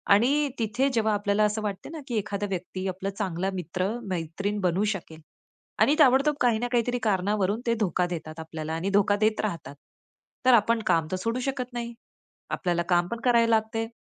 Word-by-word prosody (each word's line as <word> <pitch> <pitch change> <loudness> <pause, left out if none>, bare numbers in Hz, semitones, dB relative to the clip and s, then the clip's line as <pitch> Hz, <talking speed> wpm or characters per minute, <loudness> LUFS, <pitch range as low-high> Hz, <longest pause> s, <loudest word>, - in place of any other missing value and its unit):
आणि 280 +6 +2
तिथे 240 +5 +1
जेव्हा 220 -2 +2
आपल्याला 205 +1 +1
असं 210 +1 +1
वाटतं 205 +7 -4
ना 320 - -6
की 230 - -1
एखादा 205 0 -2
व्यक्ती 185 +1 -4
आपला 190 +2 -4
चांगला 190 -2 -2
मित्र-मैत्रीण 185 +1 -3
बनू 185 +2 +1
शकेल 160 -3 -10 0.6
आणि 295 - +5
ताबडतोब 280 +1 +5
काही 235 -3 +3
ना 245 - -1
काहीतरी 245 +1 +1
कारणावरून 205 +1 +1
ते 230 - +3
धोका 180 +1 0
देतात 160 -2 -6
आपल्याला 160 0 -5
आणि 170 +4 -2
धोका 205 0 +3
देत 215 +1 +1
राहतात, 165 -8 -4 0.7
तर 255 - +7
आपण 230 0 +4
काम 165 -2 +2
तर 185 - 0
सोडू 230 +6 -2
शकत 255 -2 -3
नाही. 235 0 -4 0.6
आपल्याला 175 -3 0
काम 175 0 +3
पण 235 +3 -5
करावं 235 -2 +4
लागतं 220 0 +1
आहे 225 - -1
210 Hz, 180 wpm, -26 LUFS, 185-235 Hz, 0.7 s, तर